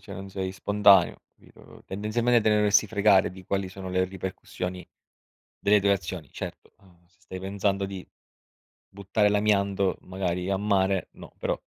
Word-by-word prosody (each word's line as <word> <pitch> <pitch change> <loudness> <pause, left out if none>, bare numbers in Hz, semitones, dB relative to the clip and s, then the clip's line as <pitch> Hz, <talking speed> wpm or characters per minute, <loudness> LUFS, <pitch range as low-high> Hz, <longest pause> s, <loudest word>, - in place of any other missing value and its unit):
cioè - - -10
non 95 +1 -8
sei 95 -1 -4
spontaneo, 100 -1 +4
capito? - - -18
Tendenzialmente 115 +4 +1
te 110 - +1
ne 105 - +4
dovresti 105 0 +3
fregare 100 -3 +4
di 95 0 -13
quali 95 0 -2
sono 95 0 -8
le 90 0 +1
ripercussioni 95 -1 -6 0.7
delle 105 +1 +3
tue 100 0 +2
azioni. 85 -5 -5
Certo, - - -8
uhm, 90 -3 -24
se 95 +3 -35
stai 95 +1 -8
pensando 100 +1 -1
di 95 -1 -7 0.8
buttare 100 +2 0
l'amianto 100 -2 +1
magari 90 -1 -3
a 100 - +1
mare, 95 -2 +1
no, - - -13
però - - -2
95 Hz, 160 wpm, -26 LUFS, 95-100 Hz, 0.8 s, spontaneo